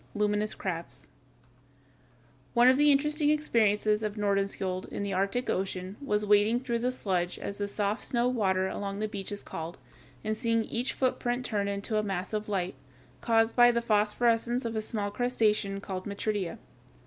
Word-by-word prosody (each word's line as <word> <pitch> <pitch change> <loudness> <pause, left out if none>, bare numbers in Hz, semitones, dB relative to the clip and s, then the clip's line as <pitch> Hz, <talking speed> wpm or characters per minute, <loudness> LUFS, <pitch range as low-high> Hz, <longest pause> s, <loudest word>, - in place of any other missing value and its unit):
LUMINOUS 210 0 0
CRABS 170 -3 -5 1.5
One 240 +1 +6
of 260 +2 +5
the 295 0 +6
interesting 295 +2 +2
experiences 215 -8 +2
of 210 -1 -3
Nordenskiöld 195 -2 -1
in - - -3
the 200 -1 -2
Arctic 200 +7 0
Ocean 190 0 -2
was 210 -5 0
wading 210 +4 +4
through 235 -3 -1
the 250 +2 0
sludge, 180 -7 -1
as 200 - -6
the 205 - -1
soft 205 +1 -2
snow 240 0 +1
water 190 -6 +1
along 200 +1 -4
the 215 +1 -1
beach 200 -2 -6
is 205 - -4
called, 165 +2 -6 0.5
and 215 0 -1
seeing 230 -1 +1
each 245 +4 -2
footprint 250 -1 -1
turn 205 -2 -1
into 200 +2 -2
a - - -1
mass 195 0 -3
of 215 0 -2
light, 185 -3 -1 0.5
caused 225 -1 +2
by 240 -1 +7
the 235 -1 +2
phosphorescence 230 +2 +2
of 230 -1 -3
a 220 - 0
small 210 -2 -2
crustacean 215 -4 +1
called 190 -1 -5
Metridia. 200 -2 -2
210 Hz, 170 wpm, -29 LUFS, 200-235 Hz, 1.5 s, by